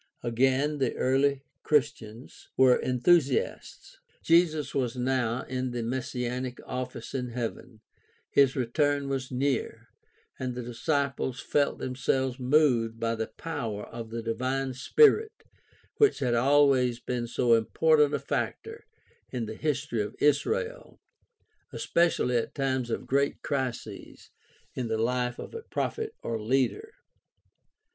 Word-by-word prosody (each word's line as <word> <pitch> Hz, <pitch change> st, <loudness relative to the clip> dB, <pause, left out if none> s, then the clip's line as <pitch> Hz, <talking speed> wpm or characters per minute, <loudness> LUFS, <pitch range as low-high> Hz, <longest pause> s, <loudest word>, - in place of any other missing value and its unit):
Again, 130 Hz, +5 st, +1 dB
the 135 Hz, -, 0 dB
early 135 Hz, +1 st, +1 dB, 0.2 s
Christians 125 Hz, -6 st, -2 dB
were 130 Hz, -1 st, +6 dB
enthusiasts. 135 Hz, +2 st, 0 dB, 0.2 s
Jesus 160 Hz, -4 st, +3 dB
was 125 Hz, -3 st, -1 dB
now 125 Hz, -1 st, 0 dB
in 130 Hz, 0 st, -3 dB
the 120 Hz, -1 st, -3 dB
messianic 125 Hz, +1 st, -3 dB
office 125 Hz, -2 st, -5 dB
in 125 Hz, -2 st, -2 dB
heaven, 115 Hz, -1 st, -6 dB, 0.5 s
his 135 Hz, -2 st, +4 dB
return 140 Hz, +3 st, 0 dB
was 135 Hz, -2 st, -2 dB
near, 130 Hz, 0 st, -2 dB, 0.5 s
and 125 Hz, -1 st, -3 dB
the 125 Hz, -, -4 dB
disciples 135 Hz, +1 st, -2 dB
felt 145 Hz, 0 st, 0 dB
themselves 130 Hz, 0 st, -1 dB
moved 125 Hz, -4 st, +2 dB
by 115 Hz, 0 st, 0 dB
the 110 Hz, -1 st, -3 dB
power 115 Hz, -11 st, -5 dB
of 115 Hz, -1 st, -8 dB
the 115 Hz, 0 st, -5 dB
divine 130 Hz, +4 st, -2 dB
Spirit 440 Hz, -, +3 dB, 0.5 s
which 425 Hz, -1 st, +4 dB
had 125 Hz, -3 st, 0 dB
always 130 Hz, -1 st, +3 dB
been 120 Hz, -1 st, -3 dB
so 120 Hz, 0 st, +2 dB
important 150 Hz, +6 st, +3 dB
a -, -, -2 dB
factor 450 Hz, 0 st, -4 dB, 0.4 s
in 125 Hz, -3 st, -3 dB
the 110 Hz, -, -6 dB
his 145 Hz, +2 st, -1 dB
tory 115 Hz, -6 st, -2 dB
of 105 Hz, +1 st, -5 dB
Israel, 460 Hz, -, 0 dB, 0.7 s
especially 170 Hz, -8 st, +1 dB
at 115 Hz, -, -3 dB
times 130 Hz, -3 st, -1 dB
of -, -, -3 dB
great 140 Hz, +1 st, 0 dB
crises 125 Hz, -7 st, -5 dB, 0.4 s
in 125 Hz, -2 st, -3 dB
the 110 Hz, -1 st, -1 dB
life 125 Hz, +2 st, 0 dB
of -, -, -8 dB
a 460 Hz, -, -6 dB
prophet 445 Hz, 0 st, -3 dB
or 115 Hz, -2 st, -3 dB
leader. 135 Hz, -, 0 dB
130 Hz, 130 wpm, -28 LUFS, 120-145 Hz, 0.7 s, were